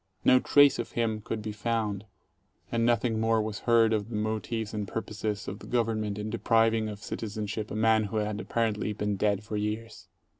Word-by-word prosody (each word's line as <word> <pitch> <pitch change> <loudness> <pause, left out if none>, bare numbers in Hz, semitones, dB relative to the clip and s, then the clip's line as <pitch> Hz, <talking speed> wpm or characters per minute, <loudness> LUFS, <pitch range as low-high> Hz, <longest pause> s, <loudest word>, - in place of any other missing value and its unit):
No 130 - +7
trace 145 0 +5
of 120 - -4
him 110 -2 0
could 110 0 -4
be 110 - -3
found, 105 -2 -2 0.7
and 115 -1 +1
nothing 115 -1 +2
more 115 0 +2
was 110 -1 -3
heard 115 -1 +5
of 105 0 -1
the 115 - -5
motives 110 +1 -2
and 105 -2 -3
purposes 105 0 -4
of 100 - -5
the - - -11
Government 110 -4 0
in 105 +1 -4
depriving 115 -1 +2
of 105 -1 -8
citizenship 105 0 -4
a - - -5
man 110 0 +3
who 110 +2 -3
had 105 0 -1
apparently 110 -2 -1
been 105 0 -1
dead 100 0 +1
for 105 0 -4
years. 105 +2 -4
110 Hz, 190 wpm, -28 LUFS, 105-115 Hz, 0.7 s, No